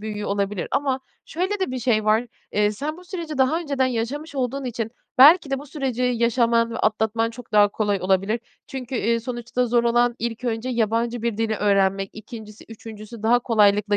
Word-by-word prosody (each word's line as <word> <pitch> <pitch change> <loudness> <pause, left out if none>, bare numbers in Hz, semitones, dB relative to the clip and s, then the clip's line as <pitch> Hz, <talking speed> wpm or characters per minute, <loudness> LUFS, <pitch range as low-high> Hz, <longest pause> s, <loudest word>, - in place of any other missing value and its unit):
büyüyor 210 -1 -5
olabilir. 200 -1 -2
Ama 270 -2 0 0.2
şöyle 375 +5 -2
de 375 - 0
bir 255 - -3
şey 220 -3 +1
var: 220 +3 +2 0.3
Eee, 210 0 +2
sen 295 +9 -4
bu 365 - -14
süreci 335 -5 -6
daha 265 +5 +3
önceden 280 -5 0
yaşamış 260 +6 -3
olduğun 265 +1 -2
için 230 -2 -3 0.3
belki 295 +2 +8
de 270 - 0
bu 285 - -10
süreci 265 -4 -3
yaşaman 235 -1 +2
ve 230 - -4
atlatman 220 +1 +1
çok 235 0 -12
daha 205 -1 +6
kolay 205 -1 -1
olabilir. 195 +5 +1 0.3
Çünkü, 265 -2 -6
iii, 230 0 +1
sonuçta 240 +1 -2
zor 235 0 +2
olan 240 0 +3
ilk 230 +1 -4
önce 235 +1 -2
yabancı 230 0 0
bir 235 -3 -1
dili 225 -1 0
öğrenmek, 195 -1 +1
2'ncisi, 215 -1 -11
3'üncüsü 220 0 -10
daha 235 +2 +4
kolaylıkla 210 -3 +3
235 Hz, 185 wpm, -23 LUFS, 215-255 Hz, 0.3 s, belki